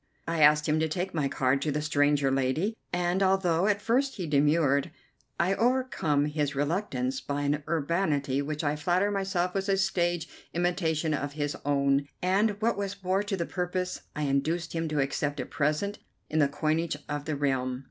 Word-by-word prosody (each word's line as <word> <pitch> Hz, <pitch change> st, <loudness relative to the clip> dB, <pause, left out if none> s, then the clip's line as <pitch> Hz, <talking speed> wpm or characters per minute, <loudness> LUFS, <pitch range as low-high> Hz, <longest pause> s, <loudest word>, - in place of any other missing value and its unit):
I 165 Hz, -1 st, 0 dB
asked 150 Hz, 0 st, +6 dB
him 155 Hz, +1 st, +2 dB
to 160 Hz, -, +1 dB
take 180 Hz, +4 st, -3 dB
my 150 Hz, -4 st, 0 dB
card 135 Hz, 0 st, +1 dB
to 150 Hz, -, 0 dB
the 150 Hz, -, -1 dB
stranger 145 Hz, -2 st, +2 dB
lady, 135 Hz, -, 0 dB, 0.2 s
and, 175 Hz, +1 st, 0 dB
although 190 Hz, -2 st, +2 dB
at 205 Hz, -1 st, +1 dB
first 260 Hz, +4 st, +1 dB
he 185 Hz, -, -4 dB
demurred, 145 Hz, -1 st, +2 dB, 0.5 s
I 180 Hz, +3 st, +3 dB
overcome 230 Hz, -, +1 dB
his 150 Hz, -1 st, -1 dB
reluctance 140 Hz, -4 st, -1 dB
by 145 Hz, 0 st, -3 dB
an 145 Hz, +1 st, 0 dB
urbanity 150 Hz, -4 st, 0 dB
which 150 Hz, +2 st, -3 dB
I 145 Hz, 0 st, +1 dB
flatter 180 Hz, +6 st, +1 dB
myself 190 Hz, -3 st, -1 dB
was 195 Hz, 0 st, -2 dB
a 195 Hz, -, +3 dB
stage 175 Hz, -3 st, 0 dB, 0.3 s
imitation 170 Hz, -3 st, 0 dB
of 145 Hz, -1 st, -3 dB
his 145 Hz, -1 st, -2 dB
own, 140 Hz, -1 st, +2 dB
and, 200 Hz, +3 st, +1 dB
what 230 Hz, -1 st, +2 dB
was 200 Hz, -1 st, -4 dB
more 185 Hz, +2 st, +1 dB
to 205 Hz, -1 st, -2 dB
the 170 Hz, -, -1 dB
purpose, 180 Hz, 0 st, -3 dB
I 150 Hz, -, -2 dB
induced 155 Hz, +5 st, 0 dB
him 165 Hz, -1 st, -1 dB
to 150 Hz, -1 st, -1 dB
accept 145 Hz, +1 st, -1 dB
a -, -, -2 dB
present 155 Hz, +8 st, -1 dB, 0.3 s
in 155 Hz, -, +1 dB
the 145 Hz, -, +5 dB
coinage 155 Hz, +2 st, -1 dB
of 145 Hz, 0 st, -4 dB
the 155 Hz, -, -2 dB
realm. 130 Hz, -3 st, -1 dB
155 Hz, 185 wpm, -28 LUFS, 145-185 Hz, 0.5 s, asked